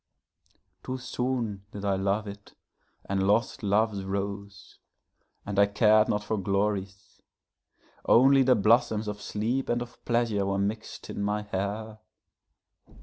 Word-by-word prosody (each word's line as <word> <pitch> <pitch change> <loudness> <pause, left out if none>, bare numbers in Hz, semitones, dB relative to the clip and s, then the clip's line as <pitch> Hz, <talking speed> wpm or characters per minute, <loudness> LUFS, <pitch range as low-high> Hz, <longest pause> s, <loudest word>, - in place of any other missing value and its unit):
Too 130 +5 -4
soon 125 -5 -3
did 100 0 -7
I 100 - +2
love 100 +2 0
it, 100 0 -11 0.5
and 95 0 0
lost 115 +5 +1
love's 105 -1 +1
rose; 100 0 -5 0.7
and 100 -1 -2
I 100 - +6
car'd 105 +1 +4
not 105 0 0
for 105 0 -2
glory's:Only 100 +6 0
the 130 -1 +4
blossoms 110 0 +2
of 105 0 -5
sleep 115 +7 -2
and 120 - +1
of 120 0 -9
pleasure 115 -5 0
were 100 0 0
mix'd 105 +3 -4
in - - -5
my 105 +1 -1
hair. 105 +2 -4
105 Hz, 130 wpm, -27 LUFS, 100-115 Hz, 0.7 s, I